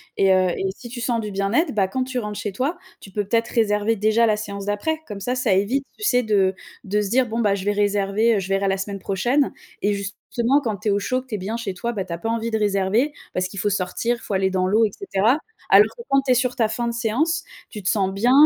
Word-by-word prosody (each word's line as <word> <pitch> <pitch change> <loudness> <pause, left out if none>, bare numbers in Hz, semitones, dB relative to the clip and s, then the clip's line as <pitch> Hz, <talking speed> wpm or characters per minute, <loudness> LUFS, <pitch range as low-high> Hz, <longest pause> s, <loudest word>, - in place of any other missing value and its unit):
Et 195 -1 +4
heu 185 -1 +4
et - - -2
si 245 - -10
tu 240 0 -6
sens 240 -1 0
du 210 -2 -4
bien-être, 200 - +1
bah 200 -3 +2
quand 255 +7 -1
tu 255 -1 -3
rentres 210 -2 -5
chez 205 0 -3
toi, 265 - -2 0.2
tu - - -11
peux 205 +1 -2
peut-être 230 +2 +1
réserver 215 -1 +2
déjà 220 +2 +3
la 215 -1 +2
séance 200 -2 -5
d'après? 310 +11 -1
Comme 210 -2 -6
ça, 245 +6 -1
ça 255 -6 +2
évite, 225 +9 +1
tu 425 - -9
sais 250 -11 +3
de 200 -4 +2 0.3
de 210 +1 0
se 205 - -2
dire: 255 +4 +3
«Bon 225 +1 -3
bah 205 -3 +3
je 195 -1 -5
vais 205 - +2
réserver, 205 +2 +2
heu, - - +1
je 190 - -5
verrai 195 0 +1
la 195 0 +1
semaine 195 +1 -4
prochaine» 240 +10 +1 0.3
et 205 +1 +2
justement, 230 +6 0
quand 220 -5 -1
tu 210 - -2
es - - +3
au 200 - +2
chaud, 255 +5 -1
que - - -20
tu 230 - -3
es - - -2
bien 210 +5 -3
chez 230 -5 -4
toi, 235 +6 -3
bah, 200 -5 -3
tu 175 - -5
as 170 - -5
pas 225 - -3
envie 230 0 -1
de 220 - +1
réserver. 205 +7 +1 0.2
Parce 185 0 0
qu'il 195 +1 -8
faut 205 - +1
sortir, 205 +5 -1
il - - -17
faut 205 - -4
aller 190 0 +1
dans 185 -1 +1
l'eau 215 +4 +4
et 210 - -2
cetera. 235 - +1 0.3
Alors - - +8
que, 470 - -8
quand 275 0 +3
tu 270 -1 0
es - - +5
sur 250 0 +1
ta 230 -4 +2
fin 235 +2 -2
de 235 - -1
séance, 245 +8 0 0.3
tu 210 - -7
te 185 - -1
sens 195 -3 +1
bien, 225 +6 +2
210 Hz, 285 wpm, -22 LUFS, 195-240 Hz, 0.3 s, Alors